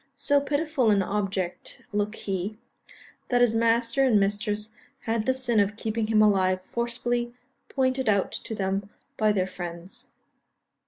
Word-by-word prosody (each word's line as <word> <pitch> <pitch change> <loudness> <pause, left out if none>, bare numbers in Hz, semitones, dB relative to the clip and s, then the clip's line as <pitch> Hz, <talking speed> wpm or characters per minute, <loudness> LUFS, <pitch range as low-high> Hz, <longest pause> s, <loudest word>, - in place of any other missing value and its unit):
So 285 -1 +2
pitiful 285 -3 0
an 200 -2 +3
object 195 -2 -3
looked 210 +1 -1
he, 195 +2 -4 0.7
that 245 -1 +3
his 240 -2 +4
master 230 +3 +2
and 240 -6 +4
mistress 205 +2 -1 0.3
had 225 0 -1
the 260 - +4
sin 245 -4 +1
of 205 0 +1
keeping 220 0 -2
him 215 -1 +4
alive 185 -3 +3
forcibly 240 +2 -2 0.3
pointed 260 -2 +1
out 200 -2 +2
to 220 - -4
them 195 0 -2 0.3
by 215 -1 +2
their 190 -3 +1
friends. 175 -1 -8
215 Hz, 145 wpm, -26 LUFS, 200-240 Hz, 0.7 s, his